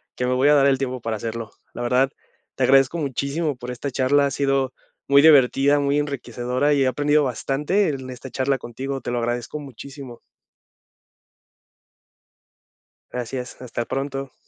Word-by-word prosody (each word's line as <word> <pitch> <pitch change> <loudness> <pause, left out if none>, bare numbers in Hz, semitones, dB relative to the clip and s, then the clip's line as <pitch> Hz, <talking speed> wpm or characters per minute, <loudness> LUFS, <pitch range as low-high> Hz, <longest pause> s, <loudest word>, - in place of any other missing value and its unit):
que 125 - -1
me 125 - +1
voy 135 +3 +3
a - - +6
dar 140 -1 +5
el 135 -1 +3
tiempo 130 -2 -3
para 115 -1 -2
hacerlo, 115 +1 -5 0.2
la - - -6
verdad, 125 +3 +2 0.4
te 130 - -1
agradezco 135 +5 +4
muchísimo 140 +2 -2
por 125 0 -7
esta 125 +3 -4
charla, 140 +3 +3
ha 140 - -4
sido 135 -1 0 0.3
muy 140 0 +6
divertida, 140 -1 +5
muy 140 0 +1
enriquecedora, 130 0 -1
y 140 -1 +3
he - - +2
aprendido 145 +3 +2
bastante 145 - 0
en 130 -3 -5
esta 130 +1 -9
charla 135 +2 0
contigo, 135 +3 -5
te 120 - -4
lo 120 - -1
agradezco 120 +5 -3
muchísimo. 135 -1 -10 2.9
Gracias, 125 +1 -5
hasta 120 -1 -4
pronto. 135 -1 -4
135 Hz, 155 wpm, -22 LUFS, 125-140 Hz, 2.9 s, a